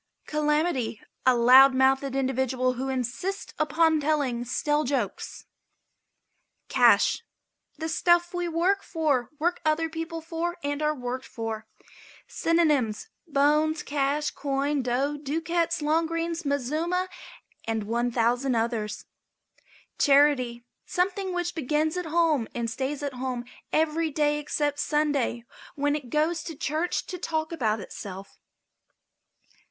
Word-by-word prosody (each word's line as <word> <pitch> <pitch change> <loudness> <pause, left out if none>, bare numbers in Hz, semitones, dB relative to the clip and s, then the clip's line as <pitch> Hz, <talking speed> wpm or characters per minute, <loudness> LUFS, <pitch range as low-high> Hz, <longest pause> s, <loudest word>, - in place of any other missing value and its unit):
CALAMITY. 300 -6 0 0.3
A 255 - +6
loud 260 +3 +7
mouthed 265 +1 +2
individual 260 -1 0
who 260 +2 -3
insists 265 - -3
upon 315 +1 +3
telling 285 -5 0
stale 295 +5 0
jokes. 245 -8 -3 1.2
CASH. - - +4 0.6
The 320 +1 -3
stuff 345 +1 +2
we 355 0 -1
work 355 +4 +1
for, 295 - 0
work 345 +4 0
other 320 +1 +1
people 325 +1 -5
for 335 +2 -3
and 285 +1 -2
are 305 0 +1
worked 255 0 -5
for. 225 -1 -5 0.6
Synonyms: 300 - +1 0.2
Bones, 300 +2 +2
Cash, 290 +1 0
Coin, 280 0 -1
Dough, 260 +4 0
Ducats, 330 +3 -1
Long 320 +2 +2
green, 330 +1 -2
Mazuma, 310 +7 0 0.6
and 225 -1 -1
1,000 240 +3 +1
others. 225 -2 -2 0.9
CHARITY. 275 -5 +4 0.2
Something 380 +1 -1
which 350 -1 -2
begins 310 +1 0
at 360 -2 -3
home 315 -7 +2
and 235 -1 -2
stays 270 +4 -3
at 285 -2 -3
home 250 -1 -4 0.3
every 320 +1 +1
day 295 0 +1
except 290 -1 -1
Sunday, 290 -6 0 0.3
when 290 0 +1
it 280 -5 -6
goes 310 +4 +1
to 325 - -6
church 310 +5 -1
to 360 - -6
talk 315 -1 -2
about 225 -9 0
itself. 195 0 -9
295 Hz, 120 wpm, -26 LUFS, 255-325 Hz, 1.2 s, loud